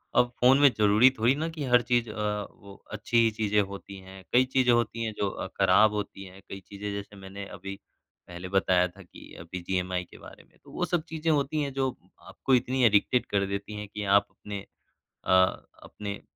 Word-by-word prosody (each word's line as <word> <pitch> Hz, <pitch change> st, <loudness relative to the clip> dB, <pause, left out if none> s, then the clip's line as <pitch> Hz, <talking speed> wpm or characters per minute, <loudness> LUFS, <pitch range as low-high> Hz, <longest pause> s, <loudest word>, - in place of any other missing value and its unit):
अब 125 Hz, -, +4 dB
फ़ोन 130 Hz, +2 st, +6 dB
में 145 Hz, -1 st, +7 dB
ज़रूरी 105 Hz, +4 st, +6 dB
थोड़ी 115 Hz, +4 st, +3 dB
ना 155 Hz, +3 st, -2 dB
कि 160 Hz, -2 st, -6 dB
हर 125 Hz, -2 st, +4 dB
चीज़ 120 Hz, -1 st, 0 dB
अ, 105 Hz, -1 st, -3 dB
वो 100 Hz, 0 st, -15 dB, 0.2 s
अच्छी 110 Hz, +3 st, -2 dB
ही 115 Hz, -1 st, +5 dB
चीजें 105 Hz, -1 st, +1 dB
होती 100 Hz, 0 st, -7 dB
हैं, 95 Hz, 0 st, -13 dB
कई 125 Hz, +1 st, +5 dB
चीजें 130 Hz, -1 st, +2 dB
होती 120 Hz, -1 st, 0 dB
हैं 110 Hz, -1 st, -3 dB
जो 100 Hz, -, 0 dB
अ, -, -, -6 dB
खराब 100 Hz, +3 st, +5 dB
होती 105 Hz, -1 st, -5 dB
हैं। 95 Hz, +1 st, -14 dB
कई 95 Hz, -, -7 dB
चीज़ें 100 Hz, +2 st, -7 dB
जैसे 100 Hz, 0 st, -7 dB
मैंने 100 Hz, 0 st, -9 dB
अभी 100 Hz, 0 st, -8 dB, 0.5 s
पहले 90 Hz, +1 st, -8 dB
बताया 90 Hz, -2 st, +3 dB
था 90 Hz, +2 st, -16 dB
कि 85 Hz, -, -15 dB
अभी 85 Hz, -, -11 dB
बीजीएमआई 90 Hz, 0 st, -2 dB
के -, -, -16 dB
बारे -, -, -14 dB
में, -, -, -29 dB
तो -, -, -16 dB
वो -, -, -2 dB
सब 175 Hz, -3 st, -1 dB
चीज़ें 160 Hz, 0 st, -2 dB
होती 150 Hz, +1 st, 0 dB
है 140 Hz, -1 st, -2 dB
जो 135 Hz, 0 st, 0 dB, 0.3 s
आपको 135 Hz, -, -3 dB
इतनी 125 Hz, +1 st, 0 dB
एडिक्टेड 110 Hz, +3 st, +3 dB
कर 100 Hz, -1 st, 0 dB
देती 100 Hz, +2 st, -5 dB
है 105 Hz, 0 st, -6 dB
कि 105 Hz, +1 st, -6 dB
आप 100 Hz, 0 st, +3 dB
अपने 105 Hz, -1 st, -8 dB, 0.7 s
अ, -, -, -1 dB, 0.5 s
अपने 100 Hz, -1 st, -7 dB
105 Hz, 210 wpm, -27 LUFS, 100-125 Hz, 0.7 s, में